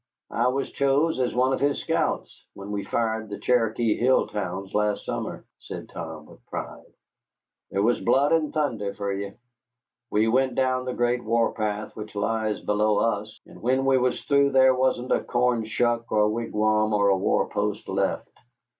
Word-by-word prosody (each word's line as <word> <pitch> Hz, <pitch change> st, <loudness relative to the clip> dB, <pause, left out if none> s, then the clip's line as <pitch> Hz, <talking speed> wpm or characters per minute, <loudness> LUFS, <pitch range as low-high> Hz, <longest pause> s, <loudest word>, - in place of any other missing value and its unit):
"I 120 Hz, +2 st, +1 dB
was 135 Hz, +2 st, -1 dB
chose 140 Hz, +3 st, +1 dB
as 125 Hz, -2 st, 0 dB
one 130 Hz, +2 st, +3 dB
of -, -, -1 dB
his 145 Hz, 0 st, +1 dB
scouts -, -, -2 dB
when 100 Hz, +1 st, -8 dB
we 100 Hz, -1 st, -2 dB
fired 110 Hz, -1 st, -1 dB
the 100 Hz, -, -5 dB
Cherokee 115 Hz, -2 st, +1 dB
hill 130 Hz, +2 st, +3 dB
towns 95 Hz, -1 st, -5 dB
last 105 Hz, 0 st, 0 dB
summer," -, -, -4 dB
said -, -, -8 dB
Tom, 80 Hz, -2 st, -7 dB
with -, -, -17 dB
pride. -, -, -7 dB, 0.8 s
"Thar 100 Hz, +1 st, 0 dB
was 120 Hz, +3 st, +2 dB
blood 140 Hz, +2 st, +3 dB
and 160 Hz, -2 st, +2 dB
thunder 115 Hz, -10 st, -2 dB
for 100 Hz, -1 st, -2 dB
ye! 100 Hz, 0 st, -5 dB, 0.8 s
We 110 Hz, +2 st, +2 dB
went 130 Hz, +2 st, +2 dB
down 130 Hz, -1 st, +1 dB
the 125 Hz, -, -3 dB
Great 120 Hz, 0 st, 0 dB
War 115 Hz, +1 st, +1 dB
path 105 Hz, -1 st, -3 dB
which 105 Hz, -1 st, -8 dB
lies 110 Hz, +1 st, -1 dB
below 105 Hz, 0 st, +1 dB
us, 105 Hz, -1 st, -1 dB
and -, -, -15 dB
when 130 Hz, +3 st, +1 dB
we 135 Hz, -1 st, +4 dB
was 125 Hz, 0 st, 0 dB
through 140 Hz, -1 st, +3 dB
there 130 Hz, 0 st, +6 dB
wasn't 130 Hz, -1 st, 0 dB
a -, -, +2 dB
corn 120 Hz, -2 st, +1 dB
shuck 115 Hz, +1 st, 0 dB
or 105 Hz, -, +3 dB
a -, -, +3 dB
wigwam 110 Hz, -1 st, +1 dB
or 100 Hz, -1 st, +3 dB
a 100 Hz, -, +4 dB
war 95 Hz, -, +1 dB
post -, -, -2 dB
left. -, -, -1 dB
115 Hz, 180 wpm, -25 LUFS, 105-130 Hz, 0.8 s, there